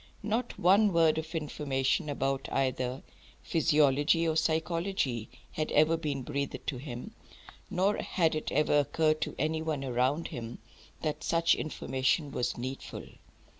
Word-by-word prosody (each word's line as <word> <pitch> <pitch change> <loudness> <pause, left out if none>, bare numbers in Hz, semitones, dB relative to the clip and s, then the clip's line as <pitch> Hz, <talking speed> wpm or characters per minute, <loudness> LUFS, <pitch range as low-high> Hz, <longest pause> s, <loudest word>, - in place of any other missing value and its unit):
Not 225 +4 -2
one 200 +4 +5
word 165 -1 +4
of 160 +1 -7
information 150 0 -1
about 135 -1 -1
either 130 -1 -1 0.4
physiology 150 - +3
or 160 - +1
psychology 160 - 0 0.2
had 155 - -3
ever 155 +2 +5
been 145 -5 -3
breathed 140 0 -4
to 135 - -2
him, 125 -2 -7 0.6
nor 195 +3 +1
had 165 -4 +1
it 155 - -3
ever 150 -1 +3
occurred 155 +2 +1
to - - -2
any 155 +2 0
one 155 -3 -2
around 130 +5 0
him 115 0 -6 0.5
that 155 -2 -2
such 165 0 +3
information 135 +1 -1
was 125 0 -2
needful. 130 +3 -6
150 Hz, 135 wpm, -30 LUFS, 135-165 Hz, 0.6 s, one